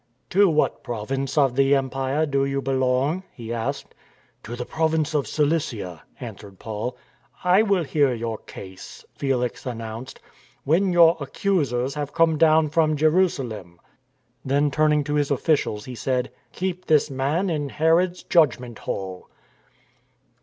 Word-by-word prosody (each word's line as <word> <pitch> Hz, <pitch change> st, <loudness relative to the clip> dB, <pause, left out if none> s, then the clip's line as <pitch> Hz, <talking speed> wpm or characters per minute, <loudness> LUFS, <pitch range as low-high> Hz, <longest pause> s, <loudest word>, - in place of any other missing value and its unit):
" -, -, -45 dB
To 200 Hz, +1 st, +5 dB
what 155 Hz, -2 st, +1 dB
province 130 Hz, +5 st, -3 dB
of 135 Hz, -4 st, +3 dB
the 135 Hz, +1 st, +4 dB
empire 135 Hz, +2 st, 0 dB
do 140 Hz, -2 st, 0 dB
you 140 Hz, 0 st, -1 dB
belong? 135 Hz, +5 st, 0 dB
" -, -, -38 dB
he 115 Hz, -1 st, -5 dB
asked. 135 Hz, +5 st, -4 dB, 0.2 s
" -, -, -37 dB
To 120 Hz, -, -6 dB
the 125 Hz, 0 st, -5 dB
province 160 Hz, 0 st, 0 dB
of 145 Hz, -6 st, 0 dB
Cilicia," 145 Hz, -, -1 dB, 0.2 s
answered 100 Hz, -5 st, -9 dB
Paul. 110 Hz, +4 st, -5 dB, 0.5 s
I 180 Hz, +3 st, +5 dB
will 200 Hz, -5 st, +2 dB
hear 145 Hz, -2 st, +2 dB
your 115 Hz, -2 st, -3 dB
case," 95 Hz, -1 st, -11 dB
Felix 125 Hz, -3 st, -2 dB
announced, 115 Hz, +1 st, -6 dB, 0.2 s
" -, -, -32 dB
when 180 Hz, +6 st, +2 dB
your 170 Hz, -1 st, +6 dB
accusers 140 Hz, -4 st, -1 dB
have 145 Hz, -1 st, -5 dB
come 165 Hz, -2 st, +3 dB
down 155 Hz, -1 st, +5 dB
from 155 Hz, -1 st, +2 dB
Jerusalem." 135 Hz, -, 0 dB, 0.6 s
Then 140 Hz, +2 st, +1 dB
turning 150 Hz, 0 st, +2 dB
to 145 Hz, +1 st, -3 dB
his 145 Hz, -1 st, +1 dB
officials 140 Hz, -7 st, 0 dB
he 130 Hz, -, -7 dB
said: 125 Hz, +1 st, -1 dB
" -, -, -40 dB
Keep 185 Hz, 0 st, -4 dB
this 155 Hz, -1 st, +3 dB
man 150 Hz, +8 st, 0 dB
in 145 Hz, -3 st, -2 dB
Herod's 170 Hz, +5 st, +2 dB
Judgment 125 Hz, -, +2 dB
Hall." 95 Hz, -2 st, -5 dB
140 Hz, 155 wpm, -24 LUFS, 125-160 Hz, 0.6 s, your